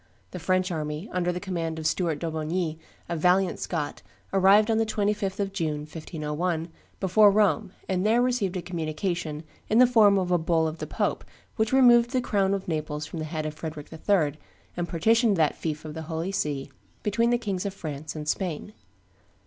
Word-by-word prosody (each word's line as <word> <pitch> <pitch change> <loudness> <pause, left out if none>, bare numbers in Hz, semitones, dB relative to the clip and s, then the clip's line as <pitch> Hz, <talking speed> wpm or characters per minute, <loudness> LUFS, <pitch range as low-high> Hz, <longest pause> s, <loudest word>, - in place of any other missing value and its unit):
The 180 - -6
French 185 +2 +1
army, 155 +2 -3
under 180 -1 0
the 180 - -4
command 170 -4 -3
of 160 - -6
Stuart 165 -1 +1
d'Aubigny, 160 +1 -2 0.3
a 170 - -2
valiant 180 +3 +2
Scot, 150 -4 -3 0.3
arrived 200 +3 +5
on 220 - +2
the 225 - +2
25th 205 -2 -1
of 195 -1 -1
June, 155 -5 -2
1501, 160 +2 -3 0.3
before 205 +2 +5
Rome, 200 -5 +2 0.2
and 185 -1 0
there 220 +3 +3
received 240 -7 +1
a 175 - -4
communication 165 -2 -3 0.3
in 220 - +3
the 250 - +8
form 220 -5 +5
of 180 -2 0
a 175 - +4
bull 160 -1 +2
of 160 +1 -5
the - - -4
pope - - -1 0.3
which 220 -1 0
removed 240 -3 +6
the 255 - +3
crown 200 -5 +1
of 195 - -6
Naples 155 -2 -3
from 160 +2 -7
the 155 - -3
head 155 0 -4
of 155 - -3
Frederick 155 -1 -7
III., 160 -3 +1 0.4
and 175 0 -3
partitioned 220 +4 +3
that 155 -2 +3
fief 155 -1 -4
of 155 - -6
the 160 - -6
Holy 165 +3 -2
See 145 -7 -2 0.3
between 230 +3 +2
the 240 - +3
Kings 200 -4 -3
of - - -3
France 155 -3 -6
and 150 -1 -6
Spain. 180 +3 -2
175 Hz, 190 wpm, -26 LUFS, 155-200 Hz, 0.4 s, the